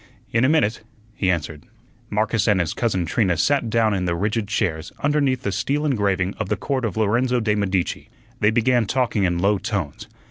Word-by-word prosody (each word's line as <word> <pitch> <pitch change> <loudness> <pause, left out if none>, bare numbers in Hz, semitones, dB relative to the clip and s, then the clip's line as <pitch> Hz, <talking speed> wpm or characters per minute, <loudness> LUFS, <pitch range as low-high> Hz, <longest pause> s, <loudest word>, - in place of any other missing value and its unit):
"In 115 +2 +2
a 130 - +4
minute," 150 -8 +2 0.3
he 95 -3 -1
answered. 80 -4 -2 0.4
Marcus 110 +1 0
and 105 -3 +3
his 85 -3 -1
cousin 95 -7 0
Trina 90 0 +1
sat 130 +6 +1
down 110 -1 +2
in 95 -2 -1
the 85 -1 0
rigid 105 +4 -1
chairs 85 -7 -2
underneath 145 -3 +1
the 100 - -1
steel 135 +11 -1
engraving 100 -8 0
of 110 -3 -3
the 105 - 0
Court 130 +3 -2
of 105 -3 -3
Lorenzo 120 +4 +2
de' 110 -2 +1
Medici. 95 -3 -1 0.3
They 105 - +4
began 120 0 +2
talking 120 -6 +1
in 85 -1 0
low 100 +3 +2
tones. 100 - -4
105 Hz, 190 wpm, -22 LUFS, 95-120 Hz, 0.4 s, a